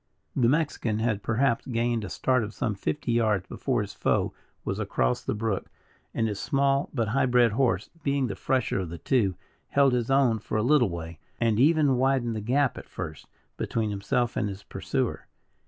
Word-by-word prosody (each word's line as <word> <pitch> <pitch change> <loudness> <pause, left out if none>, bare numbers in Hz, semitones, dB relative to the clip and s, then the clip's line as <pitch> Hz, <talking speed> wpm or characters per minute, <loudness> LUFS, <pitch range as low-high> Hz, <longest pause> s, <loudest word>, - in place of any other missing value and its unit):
The 120 -3 +3
Mexican 140 -7 0
had, 110 -2 0
perhaps, 115 +3 +1
gained 120 -2 0
a 95 - -5
start 130 +3 +1
of 105 +1 -6
some 110 - -1
fifty 120 +6 -2
yards 110 -5 +2
before 125 +2 -1
his 100 - -8
foe - - 0 0.3
was - - -2
across - - 0
the - - -2
brook, 105 -2 -2 0.4
and 115 - 0
his 105 -2 -3
small 140 +5 +1
but 115 -6 -1
high 130 +3 +2
bred 120 -2 +4
horse, 110 -5 0
being 140 -2 +1
the 115 - -3
fresher 130 -6 0
of 90 -3 -3
the 85 - -6
two, 100 +1 +1 0.3
held 140 -2 +4
his 120 -1 0
own 135 -5 +3
for 110 - -3
a 105 - +1
little 125 -3 +4
way, 85 -2 -6 0.2
and 115 -2 +2
even 145 -1 +4
widened 130 -3 +1
the 110 - -3
gap 130 +5 +1
at - - -13
first, 80 -1 -7 0.3
between 110 -2 -1
himself 110 +4 -1
and 105 - 0
his 100 0 -8
pursuer. - - -3
115 Hz, 190 wpm, -27 LUFS, 105-130 Hz, 0.4 s, bred